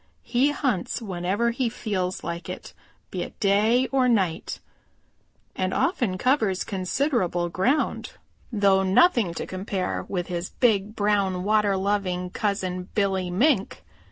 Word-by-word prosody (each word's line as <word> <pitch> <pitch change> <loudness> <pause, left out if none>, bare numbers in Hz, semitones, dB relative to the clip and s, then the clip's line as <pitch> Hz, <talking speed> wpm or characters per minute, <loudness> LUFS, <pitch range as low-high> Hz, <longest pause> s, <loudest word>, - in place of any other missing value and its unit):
He 260 +4 +2
hunts 270 - -1
whenever 200 +2 -1
he 240 0 -1
feels 190 -5 -3
like 170 0 -5
it, - - -7 0.4
be - - -3
it - - -7
day 215 +5 +3
or 260 -2 +3
night, 190 -8 0 1.0
and 185 0 -1
often 240 - 0
covers 220 -6 +1
considerable 185 - 0
ground, 240 - 0 0.4
though 200 -3 +3
nothing 195 - +3
to - - -4
compare 185 0 -3
with 180 -3 -2
his 175 0 -4
big, 215 -3 +1
brown, 200 -3 +1
water 210 -1 +2
loving 190 -2 -1
cousin, 185 -3 -2
Billy 190 -3 +1
Mink. 210 - +1
200 Hz, 130 wpm, -25 LUFS, 185-235 Hz, 1.0 s, day